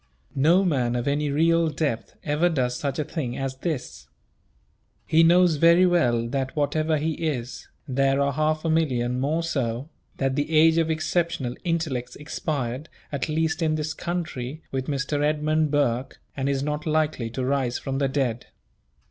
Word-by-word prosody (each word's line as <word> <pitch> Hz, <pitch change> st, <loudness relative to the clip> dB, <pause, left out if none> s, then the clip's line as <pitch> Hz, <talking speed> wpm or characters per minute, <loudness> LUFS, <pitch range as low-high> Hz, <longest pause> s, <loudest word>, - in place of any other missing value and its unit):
No 165 Hz, +8 st, +4 dB
man 125 Hz, -8 st, +1 dB
of 120 Hz, +1 st, -2 dB
any 145 Hz, +1 st, +1 dB
real 165 Hz, +3 st, +3 dB
depth 140 Hz, -8 st, -3 dB
ever 150 Hz, +4 st, +2 dB
does 125 Hz, -6 st, 0 dB
such 140 Hz, +1 st, -3 dB
a 155 Hz, -, 0 dB
thing 140 Hz, -6 st, -4 dB
as 135 Hz, -1 st, -3 dB
this. 150 Hz, -3 st, -4 dB, 1.0 s
He 160 Hz, -, +4 dB
knows 170 Hz, -1 st, +5 dB
very 170 Hz, +4 st, +6 dB
well 120 Hz, -10 st, +2 dB
that 135 Hz, +1 st, -2 dB
whatever 155 Hz, +2 st, +1 dB
he 155 Hz, +2 st, -1 dB
is, 140 Hz, -6 st, -4 dB, 0.2 s
there 135 Hz, +1 st, +2 dB
are 140 Hz, 0 st, +1 dB
half 155 Hz, +2 st, 0 dB
a -, -, +1 dB
million 125 Hz, -6 st, +1 dB
more 155 Hz, +5 st, 0 dB
so; 135 Hz, -4 st, -2 dB, 0.3 s
that 135 Hz, -1 st, 0 dB
the 145 Hz, +2 st, -1 dB
age 160 Hz, +1 st, +6 dB
of 165 Hz, -1 st, +1 dB
exceptional 160 Hz, -4 st, -1 dB
intellects 160 Hz, -8 st, -2 dB
expired, 145 Hz, -2 st, -4 dB, 0.2 s
at 140 Hz, 0 st, -2 dB
least 160 Hz, +2 st, 0 dB
in 155 Hz, -1 st, +2 dB
this 155 Hz, 0 st, -2 dB
country, 160 Hz, -5 st, -4 dB
with 130 Hz, -1 st, -3 dB
Mr. 145 Hz, 0 st, -1 dB
Edmund 155 Hz, +1 st, +1 dB
Burke, 135 Hz, -3 st, 0 dB, 0.2 s
and 135 Hz, 0 st, -1 dB
is 135 Hz, -1 st, 0 dB
not 150 Hz, +1 st, -3 dB
likely 155 Hz, -6 st, 0 dB
to 125 Hz, +2 st, -3 dB
rise 130 Hz, -2 st, 0 dB
from 135 Hz, 0 st, -3 dB
the 140 Hz, -, +2 dB
dead. 130 Hz, -4 st, -1 dB
145 Hz, 165 wpm, -25 LUFS, 130-160 Hz, 1.0 s, very